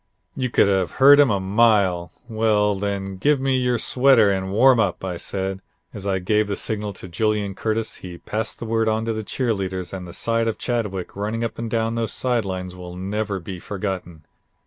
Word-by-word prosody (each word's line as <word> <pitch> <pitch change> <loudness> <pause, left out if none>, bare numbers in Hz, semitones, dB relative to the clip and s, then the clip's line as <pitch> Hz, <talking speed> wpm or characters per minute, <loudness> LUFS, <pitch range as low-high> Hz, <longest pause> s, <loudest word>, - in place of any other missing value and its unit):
"You 130 -1 -1
could 115 - +4
have 95 -3 +1
heard 140 +2 +7
him 145 -3 +6
a 100 -3 +1
mile. 95 -4 +2 0.2
'Well 110 -2 +2
then, 100 -1 -3
give 145 +8 +2
me 135 0 +1
your 125 -1 +1
sweater 125 -4 +4
and 95 -1 -2
warm 125 +4 +5
up,' 95 -3 0
I 90 -2 -3
said, 95 +2 -2
and 95 0 -9 0.3
as 100 -1 -6
I 95 -1 +1
gave 105 +3 +1
the 100 - -2
signal 105 -1 -2
to 90 - -8
Julian 105 +2 -1
Curtis, 110 +2 -2
he 90 -2 -9
passed 110 +5 -3
the - - -6
word 115 0 +1
on 110 +1 0
to 115 - -1
the 110 - -3
cheer 115 +3 -1
leaders 95 -2 -4
and 90 -2 -6
the - - -9
sight 115 +4 0
of 115 - -1
Chadwick 105 -7 -3
running 110 +3 -2
up 115 - -4
and 115 -1 -3
down 115 0 0
those 115 -1 -1
side 120 -4 0
lines 90 -1 -5
will 90 -1 -9
never 100 +2 -3
be 90 +1 -7
forgotten. 90 -5 -5
105 Hz, 215 wpm, -22 LUFS, 95-115 Hz, 0.3 s, heard